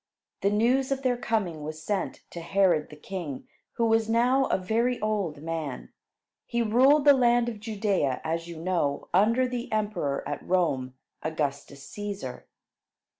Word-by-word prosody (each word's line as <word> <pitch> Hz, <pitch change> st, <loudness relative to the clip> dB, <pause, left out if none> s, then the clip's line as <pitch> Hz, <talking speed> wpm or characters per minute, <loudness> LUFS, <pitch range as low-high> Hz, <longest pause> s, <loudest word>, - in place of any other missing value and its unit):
The 200 Hz, -, +3 dB
news 245 Hz, +6 st, +2 dB
of 270 Hz, 0 st, -1 dB
their 255 Hz, -1 st, +2 dB
coming 215 Hz, -9 st, -1 dB
was 155 Hz, +1 st, -6 dB
sent 205 Hz, +1 st, -2 dB
to 170 Hz, -, -7 dB
Herod 175 Hz, -3 st, +2 dB
the 150 Hz, -, -11 dB
king, 155 Hz, -3 st, -6 dB, 0.3 s
who 230 Hz, -, +1 dB
was 225 Hz, 0 st, +2 dB
now 250 Hz, +4 st, +3 dB
a -, -, +1 dB
very 230 Hz, +6 st, 0 dB
old 200 Hz, -9 st, -2 dB
man. 160 Hz, -4 st, -5 dB, 0.5 s
He 235 Hz, -1 st, 0 dB
ruled 265 Hz, +7 st, +4 dB
the 285 Hz, -, +9 dB
land 240 Hz, -2 st, +3 dB
of 225 Hz, -3 st, -4 dB
Judea, 205 Hz, -, 0 dB
as 165 Hz, +1 st, -2 dB
you 170 Hz, -1 st, -8 dB
know, 165 Hz, -5 st, -1 dB
under 230 Hz, +7 st, +4 dB
the 245 Hz, -1 st, -5 dB
emperor 205 Hz, -10 st, -1 dB
at -, -, -4 dB
Rome, 140 Hz, -8 st, 0 dB, 0.3 s
Augustus 145 Hz, -2 st, -3 dB
Cæsar. 205 Hz, -10 st, -6 dB
200 Hz, 155 wpm, -27 LUFS, 160-235 Hz, 0.5 s, the